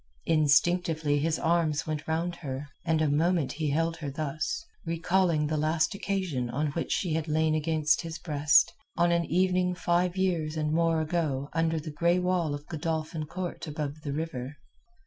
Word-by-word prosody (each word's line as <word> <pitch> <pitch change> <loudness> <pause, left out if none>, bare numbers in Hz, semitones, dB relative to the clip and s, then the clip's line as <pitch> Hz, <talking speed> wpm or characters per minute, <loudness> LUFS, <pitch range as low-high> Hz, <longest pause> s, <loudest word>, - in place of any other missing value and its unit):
Instinctively 155 0 +3
his 160 +2 +1
arms 160 -3 +1
went 155 -1 -4
round 170 +2 -1
her, 140 -3 -5 0.2
and 160 -2 +1
a - - +2
moment 155 -1 +2
he 150 +1 -2
held 165 +3 0
her 155 -3 -4
thus, 155 - -3 0.2
recalling 170 -1 +1
the 155 +1 -1
last 155 +1 +1
occasion 185 -11 -2
on 145 +5 -1
which 165 +3 -3
she 175 -5 0
had 160 0 -1
lain 155 0 +2
against 155 -1 +2
his 165 -1 -6
breast, 150 -2 +3 0.2
on 170 0 +3
an 170 0 +2
evening 180 +1 +1
five 175 +1 +1
years 165 -5 0
and 155 0 0
more 165 -1 +2
ago 150 -4 -1
under 165 0 +1
the 155 0 -6
grey 170 +4 +2
wall 180 -4 0
of 145 +1 -9
Godolphin 160 -1 -3
Court 175 0 -5
above 150 0 -4
the 150 -2 -4
river. 145 -2 -4
160 Hz, 170 wpm, -28 LUFS, 150-170 Hz, 0.2 s, Instinctively